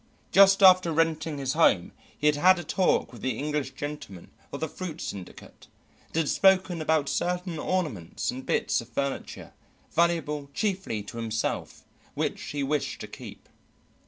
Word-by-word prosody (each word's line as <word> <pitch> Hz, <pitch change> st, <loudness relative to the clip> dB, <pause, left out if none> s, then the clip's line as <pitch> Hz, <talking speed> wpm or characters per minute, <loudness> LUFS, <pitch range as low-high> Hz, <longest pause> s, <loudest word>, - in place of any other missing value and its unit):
Just 195 Hz, 0 st, +6 dB
after 185 Hz, -2 st, +7 dB
renting 160 Hz, -1 st, 0 dB
his 135 Hz, -1 st, -2 dB
home 130 Hz, -, +3 dB, 0.3 s
he 150 Hz, -, -4 dB
had 150 Hz, 0 st, +5 dB
had 185 Hz, +5 st, +5 dB
a 175 Hz, -, -5 dB
talk 175 Hz, -7 st, +1 dB
with 120 Hz, -, -11 dB
the 130 Hz, -4 st, -2 dB
English 145 Hz, -2 st, -3 dB
gentleman 145 Hz, -12 st, -7 dB, 0.2 s
of -, -, -5 dB
the 160 Hz, -, -2 dB
fruit 165 Hz, 0 st, -7 dB
syndicate 95 Hz, -3 st, -9 dB, 0.4 s
and -, -, -16 dB
had 165 Hz, -2 st, +1 dB
spoken 185 Hz, -3 st, +3 dB
about 155 Hz, -2 st, +1 dB
certain 180 Hz, -1 st, -2 dB
ornaments 150 Hz, -, -2 dB
and 130 Hz, +1 st, -7 dB
bits -, -, 0 dB
of 115 Hz, -, -13 dB
furniture, 140 Hz, +3 st, -4 dB, 0.4 s
valuable 155 Hz, -4 st, 0 dB
chiefly 190 Hz, -, -2 dB
to 110 Hz, -, -9 dB
himself, 115 Hz, -1 st, -3 dB, 0.3 s
which -, -, -2 dB
he 145 Hz, -1 st, -3 dB
wished 145 Hz, +1 st, -1 dB
to -, -, -6 dB
keep. -, -, -11 dB
150 Hz, 160 wpm, -27 LUFS, 135-175 Hz, 0.4 s, after